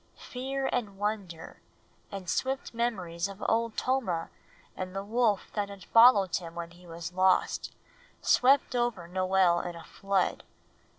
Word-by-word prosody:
Fear 265 +2 -2
and 210 -5 -2
wonder, 200 -5 -4 0.5
and 195 -2 -7
swift 265 +9 -2
memories 190 -7 -2
of 195 0 -8
Old 230 0 0
Tomah 230 -11 -1 0.4
and 185 0 -6
the 195 - -3
wolf 220 -1 0
that 205 -1 -2
had 200 -2 -10
followed 225 -6 +6
him 170 -2 -9
when 170 0 -6
he 175 +1 -17
was 170 +1 -7
lost, 185 0 +2 0.5
swept 265 0 +3
over 240 -8 -1
Noel 185 -1 +2
in 175 0 -5
a 170 - -10
flood. 195 -2 -1
195 Hz, 140 wpm, -29 LUFS, 180-230 Hz, 0.5 s, followed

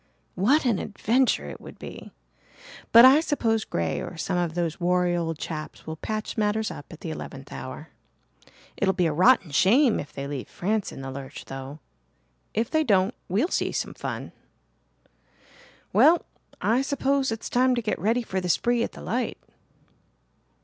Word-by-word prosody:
"What 265 - +3
an 230 -6 +2
adventure 235 +5 +1
it - - -8
would - - -11
be! - - -9 0.8
But 235 +2 +10
I 270 +3 +8
suppose 230 -8 0
Grey 85 -2 -2
or 175 - -7
some 180 +3 -2
of 170 -2 -1
those 170 -1 -2
wary 180 0 +2
old 165 -2 -2
chaps 155 -1 -6
will 160 - -5
patch 215 +6 -4
matters 215 0 0
up 145 - -10
at 165 - -11
the 165 - -4
eleventh 135 -3 -8
hour. 130 +5 -7 0.9
It'll 190 -2 +1
be 180 -2 +2
a 160 - +1
rotten 185 - +4
shame 230 - +4
if 145 - -7
they 140 - -6
leave 140 -2 -5
France 205 +2 -1
in - - -8
the 135 - -5
lurch, 135 0 -8
though. 135 +3 -8 0.7
If 225 +2 0
they 315 0 +3
don't, 200 -4 +3 0.2
we'll 215 - +1
see - - 0
some - - -3
fun. - - -5 1.6
Well, 335 +2 +5 0.3
I 230 +5 +2
suppose 275 -1 0
it's 225 0 -4
time 255 +1 +3
to 240 - -1
get 215 -2 -1
ready 230 +4 +1
for 190 -4 -3
the 180 - -3
spree 240 +6 +2
at - - -2
the - - -10
light." - - -2
195 Hz, 170 wpm, -26 LUFS, 160-240 Hz, 1.6 s, But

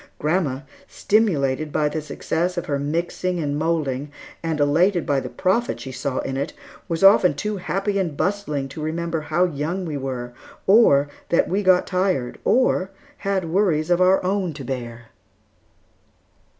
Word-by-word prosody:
Grandma, 150 -4 0 0.3
stimulated 155 -9 +1
by 150 - +1
the 155 +1 -3
success 170 +4 -2
of 175 - -2
her 140 -1 -1
mixing 170 +5 -2
and 145 -3 -2
moulding, 150 -4 -1 0.3
and 160 -2 -2
elated 170 +6 +3
by 140 -1 +1
the 125 - -6
profit 230 +6 0
she 130 - -7
saw 130 0 -3
in 135 0 -4
it, 140 - -3 0.3
was 165 0 -2
often 195 -2 +6
too 210 -1 -3
happy 195 +2 -1
and 165 -7 -2
bustling 165 -9 -1
to 145 +3 -8
remember 165 +1 -2
how 155 +4 +1
young 170 +3 -3
we 155 -3 -3
were, 125 -3 -5 0.3
or 190 -9 +5 0.2
that 170 - +3
we 195 +3 0
got 185 -2 +4
tired, 180 -9 -1
or 235 -6 +2 0.3
had 190 -4 -2
worries 175 -4 +1
of 175 +1 +3
our 185 +1 +4
own 185 -2 -1
to 140 -3 -7
bear. 120 -2 -6
165 Hz, 160 wpm, -22 LUFS, 145-185 Hz, 0.3 s, often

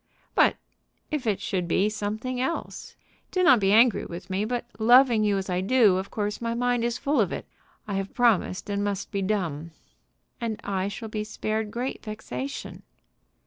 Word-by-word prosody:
"But - - +4 0.6
if 290 -6 -2
it 200 -3 +1
should 190 -4 -2
be 190 +4 +2
something 220 +4 -3
else? 300 +6 -4 0.3
Do 370 - 0
not 305 -10 +7
be 195 -1 +2
angry 230 +1 +5
with 175 +3 -8
me, 195 +3 0
but, 240 +1 -2
loving 240 0 +6
you 205 -1 +2
as 195 - -3
I 180 -1 0
do, 210 -2 +4
of 190 +1 -4
course 210 0 -3
my 230 0 -1
mind 245 0 +1
is 235 0 0
full 280 -3 +1
of 190 - 0
it. - - -5 0.4
I 205 - -3
have 195 0 -4
promised, 225 -6 +2
and 200 0 -1
must 200 -1 -3
be 200 -2 -1
dumb." 170 -6 -2 0.7
"And 225 -2 -2
I 195 -1 -1
shall 220 +3 -6
be 215 0 -3
spared 215 0 -3
great 245 +5 -4
vexation." 140 - -6
215 Hz, 185 wpm, -26 LUFS, 195-235 Hz, 0.7 s, not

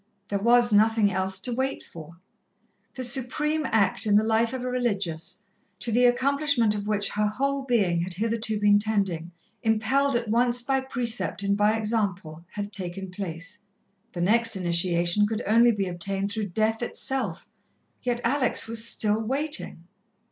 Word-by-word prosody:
There 200 - -1
was 240 +1 +4
nothing 215 0 +3
else 190 0 -2
to 245 - -1
wait 265 +2 -2
for. 165 0 -12 0.8
The 260 - -4
supreme 285 +5 +1
act 220 0 +1
in 205 - +3
the 210 - +5
life 225 +1 +1
of 260 -1 -5
a - - -3
religious, 205 -8 -2 0.4
to 235 - -1
the 245 +3 +3
accomplishment 260 -2 +2
of 205 0 -5
which 205 -1 0
her 210 0 0
whole 275 +5 -2
being 195 -9 +1
had 175 0 -4
hitherto 220 +1 -1
been 205 0 +4
tending, 195 -6 -1 0.3
impelled 240 +5 +1
at 235 -1 -1
once 240 +2 +1
by 270 +1 0
precept 230 -8 0
and 200 0 +1
by 210 +2 +2
example, 195 -8 -3
had 205 0 -5
taken 190 0 -5
place. 180 -1 -6 0.5
The 175 - -4
next 225 +4 +3
initiation 175 +2 +1
could 220 +1 -3
only 235 +3 +5
be 200 -3 -2
obtained 195 +3 -3
through 210 0 -3
death 220 +4 -1
itself, 240 -6 -2 0.5
yet 245 -1 -2
Alex 255 +1 +2
was 225 0 -1
still 215 -1 +1
waiting. 275 - -2
215 Hz, 160 wpm, -25 LUFS, 195-240 Hz, 0.8 s, the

